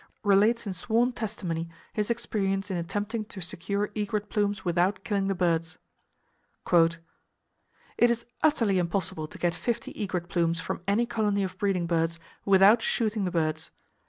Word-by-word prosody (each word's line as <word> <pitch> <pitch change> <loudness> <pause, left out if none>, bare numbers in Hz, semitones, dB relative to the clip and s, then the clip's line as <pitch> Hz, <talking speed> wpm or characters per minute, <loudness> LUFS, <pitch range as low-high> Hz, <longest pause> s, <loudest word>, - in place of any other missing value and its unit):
relates 210 +4 +4
in 200 - -3
sworn 230 +7 +1
testimony 190 -8 -4 0.2
his 210 0 -1
experience 195 -4 -1
in 185 - -1
attempting 205 +6 -2
to 210 -2 -7
secure 200 +4 -2
egret 210 0 -2
plumes 205 -2 0
without 180 +3 +1
killing 200 -2 0
the 195 - 0
birds: 165 -2 0 1.0
"It 165 -1 +5 1.1
is 235 0 -1 0.2
utterly 225 -11 +3
impossible 175 -2 -1
to - - -11
get 175 -1 +1
fifty 235 +4 -3
egret 185 -4 -3
plumes 170 -2 +1
from 180 - -4
any 210 +4 +3
colony 210 -4 0
of 185 -1 -4
breeding 195 -4 +1
birds 165 -1 0 0.3
without 200 +3 +6
shooting 215 -3 0
the - - 0
birds. 160 -2 -1
195 Hz, 150 wpm, -27 LUFS, 175-210 Hz, 1.1 s, without